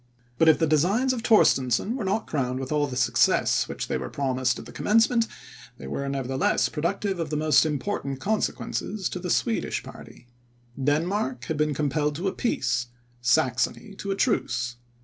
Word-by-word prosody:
But 165 - +6
if 160 - +6
the 165 - +2
designs 190 - +2
of 245 - -3
Torstensohn 205 - +3
were 255 - -3
not 200 +3 -1
crowned 130 -4 -2
with 135 +1 -5
all 150 -1 +1
the 130 - -6
success 120 -2 +2
which - - -5
they 65 - -1
were 65 - -5
promised 130 -2 0
at - - -9
the - - -11
commencement, 225 +2 +2 0.5
they - - -10
were, 140 - -3
nevertheless, 135 -1 0
productive 190 +4 -2
of 165 -2 -2
the 150 - -1
most 155 +1 +4
important 145 -3 -3
consequences 210 +1 -2
to 180 - -5
the 180 0 -5
Swedish 225 +5 0
party. - - -12 0.6
Denmark 180 - 0
had 160 - -3
been 150 -1 +1
compelled 150 +1 0
to 175 +6 -2
a 190 - -1
peace, 120 - -1 0.3
Saxony 125 - +1
to 200 - -5
a 195 - 0
truce. 125 - 0
155 Hz, 175 wpm, -25 LUFS, 130-200 Hz, 0.6 s, But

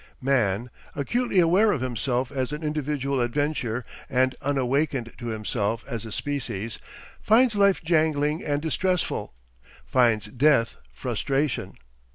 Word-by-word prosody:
Man, 120 -4 +1 0.2
acutely 235 - -1
aware 185 +6 +5
of 140 - -1
himself 125 +1 -1
as 130 -1 -2
an 150 +2 -5
individual 145 -3 -1
adventure 125 -2 -1 0.2
and 130 0 +2
unawakened 135 -2 0
to 120 - -6
himself 110 0 -2
as 115 -4 -5
a - - -8
species, 115 -6 -3 0.4
finds 235 +2 +4
life 200 -3 +3
jangling 155 -2 +1
and 145 0 -1
distressful, 180 - -1 0.5
finds 115 -4 +3
death 120 +1 +2
frustration. 135 +3 -2
135 Hz, 120 wpm, -25 LUFS, 120-155 Hz, 0.5 s, aware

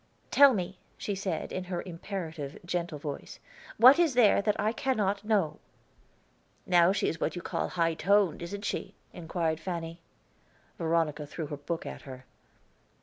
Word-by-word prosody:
"Tell 280 -3 +7
me," 185 -1 -4 0.2
she 205 - -3
said, 190 -4 -3
in 185 - -4
her 180 -1 -3
imperative, 165 -5 -6
gentle 175 -2 -2
voice. 145 -1 -7 0.4
"What 255 +7 +8
is 325 -7 +3
there 220 -5 +5
that 210 0 0
I 215 +2 +2
cannot 210 -6 0
know?" 205 -8 +1 1.1
"Now 175 0 +5
she 200 +1 0
is 165 - -3
what - - -1
you 175 - -6
call - - -2
high 165 -2 +1
toned, 195 +1 +2
isn't 200 +4 -3
it?" - - -6 0.2
inquired 165 -2 -2
Fanny. 165 -1 -5 0.8
Veronica 160 -3 0
threw 160 +2 -5
her 145 0 -6
book 160 +4 -4
at - - -7
her. 130 -1 -10
175 Hz, 155 wpm, -29 LUFS, 165-200 Hz, 1.1 s, What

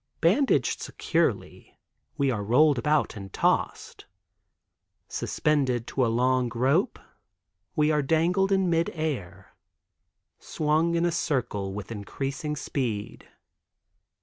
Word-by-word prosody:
Bandaged 215 - +2
securely - - -2 0.4
we 140 -2 +2
are 105 -4 -2
rolled 135 +5 +4
about 150 0 +1
and 100 -2 -8
tossed. - - -1 1.0
Suspended 130 -6 0
to 130 - -1
a - - +3
long 125 +1 +1
rope 140 - +2 0.8
we 150 -1 +3
are 150 -1 +2
dangled 170 +7 +2
in 190 -1 +2
mid 170 0 +1
air, 100 - -4 0.9
swung 160 +2 0
in 170 +1 +2
a 175 - +1
circle 120 - -1
with 100 +2 -7
increasing 135 +8 -4
speed. 115 -6 -4
140 Hz, 110 wpm, -26 LUFS, 115-160 Hz, 1.0 s, rolled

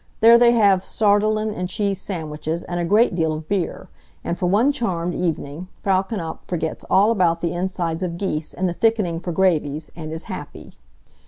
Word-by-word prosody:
There 230 +1 +7
they 240 0 +6
have 200 -5 +4
sardellen 215 +1 +1
and 180 -2 -4
cheese 200 -1 -1
sandwiches 160 -2 -4
and 175 0 -4
a - - 0
great 210 +6 +3
deal 160 -2 0
of 155 0 -6
beer, 190 -2 -2 0.4
and 170 - -2
for 180 - -1
one 220 +10 +3
charmed 180 -10 -2
evening 165 -1 -3 0.2
Frau 190 -1 +3
Knapf 190 -5 -5
forgets 165 -3 -3
all 205 +4 +5
about 175 -6 +2
the 170 -1 -1
insides 175 -2 -2
of 170 -2 -3
geese 160 -5 -3
and 185 - -1
the 175 - -1
thickening 205 -5 +1
for 175 - -4
gravies, 160 -4 0
and 155 -2 -7
is 160 0 -5
happy. - - -8
180 Hz, 185 wpm, -22 LUFS, 165-205 Hz, 0.4 s, There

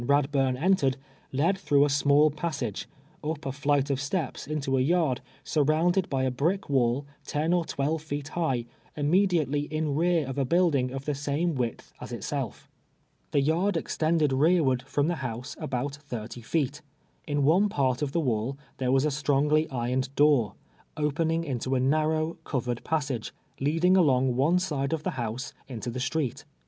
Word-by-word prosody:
]>urcli - - -5
ami 140 +2 +2
JRa<ll)uni 135 -3 +1
entered, 170 -8 +3 0.3
led 155 +8 +2
tlirougli 145 -6 +3
a - - 0
small 145 +1 +4
inissaiiv, 145 - -3 0.4
np 155 +2 -1
a 135 -3 -4
iliiilit" 140 +1 +1
oi' - - +2
steps 140 +2 -3
into 140 -3 -1
a 130 - +2
yard, 150 -3 +2 0.2
surrouiuled 160 +5 +2
l>y 135 -1 +1
a 130 - +1
briek 170 +10 0
wall 130 0 +1 0.2
ten 155 +4 0
or 175 -1 +2
twelve 150 +3 -1
feet 145 -1 -5
lii,u"1i, 135 -9 0 0.3
iuimediately 150 -3 +2
ill 155 -1 -1
rear 165 +1 +2
of 135 +1 -4
a 135 - +2
Imildin:^ 155 -6 +3
of 135 +1 -6
the 150 - 0
«aiuc 150 +4 -1
Avidth 120 -3 -3
as - - -7
itself. - - -4 0.6
The 140 - +2
yard 170 +6 +1
extended 155 -2 +1
rearward 140 -3 +3
from 145 +2 +1
the 175 -1 0
house 125 -1 -5
ahout 135 +2 -2
thirty 120 -5 -7
feet. 145 +3 -1 0.5
In 145 -1 0
one 180 +9 +4
part 130 -7 0
of 145 -2 -1
the 165 - +1
Avail 125 0 -1 0.2
there 130 -1 0
Avas 135 +2 +3
a - - +3
stronijlv 150 +2 +2
irc^ned 125 +1 -1
door, 145 -7 +3 0.4
0]>eninu^ 160 +2 0
into 130 -2 -2
a - - +2
narrow, 155 +4 +1
covered 125 -3 -2
]iassai^e, 140 -8 -1 0.3
leadin;;; 165 +6 +3
ahmij; 130 -7 +3
one 145 +8 +3
side 150 -6 -1
of 155 -1 -2
the 185 - -1
house 120 -2 -4 0.2
iiito 120 -1 -5
the 130 - -4
street. 135 0 -2
145 Hz, 175 wpm, -27 LUFS, 130-160 Hz, 0.6 s, small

